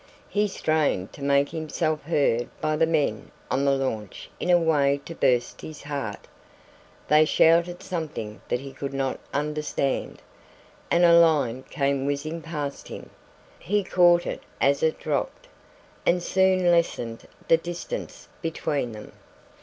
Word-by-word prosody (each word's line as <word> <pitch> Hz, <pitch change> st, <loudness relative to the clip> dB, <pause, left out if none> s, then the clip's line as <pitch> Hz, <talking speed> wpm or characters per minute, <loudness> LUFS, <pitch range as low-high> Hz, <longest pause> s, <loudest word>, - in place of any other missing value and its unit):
He 210 Hz, 0 st, +1 dB
strained 155 Hz, -, 0 dB
to -, -, -12 dB
make 140 Hz, 0 st, +3 dB
himself 155 Hz, -1 st, -2 dB
heard 140 Hz, -7 st, +1 dB
by 155 Hz, 0 st, 0 dB
the 160 Hz, +1 st, +3 dB
men 145 Hz, -10 st, 0 dB, 0.2 s
on 135 Hz, +2 st, +1 dB
the 140 Hz, -, +4 dB
launch 110 Hz, -7 st, -4 dB
in -, -, -3 dB
a 175 Hz, -, +7 dB
way 145 Hz, -4 st, +2 dB
to 165 Hz, -, -7 dB
burst 125 Hz, -6 st, +1 dB
his 155 Hz, -1 st, -9 dB
heart. 145 Hz, -1 st, -5 dB, 0.8 s
They 150 Hz, +1 st, +6 dB
shouted 170 Hz, +3 st, +3 dB
something 155 Hz, -11 st, -5 dB
that 125 Hz, -, -1 dB
he 135 Hz, 0 st, -9 dB
could 140 Hz, -1 st, -5 dB
not 135 Hz, -1 st, -1 dB
understand, 150 Hz, -2 st, -2 dB, 0.7 s
and 175 Hz, +1 st, +4 dB
a 170 Hz, -, +7 dB
line 145 Hz, -7 st, +3 dB
came 140 Hz, -2 st, 0 dB
whizzing 155 Hz, +4 st, -3 dB
past 150 Hz, -4 st, -5 dB
him. -, -, -9 dB, 0.5 s
He 205 Hz, +2 st, 0 dB
caught 175 Hz, -2 st, +4 dB
it -, -, -4 dB, 0.2 s
as 140 Hz, +1 st, +3 dB
it 160 Hz, 0 st, +1 dB
dropped, 145 Hz, -3 st, -3 dB, 0.6 s
and 175 Hz, 0 st, +2 dB
soon 185 Hz, -1 st, +3 dB
lessened 120 Hz, -9 st, 0 dB, 0.2 s
the 165 Hz, -, +6 dB
distance 175 Hz, -, -6 dB
between 145 Hz, -7 st, -2 dB
them. 105 Hz, -1 st, -10 dB
150 Hz, 145 wpm, -25 LUFS, 140-170 Hz, 0.8 s, a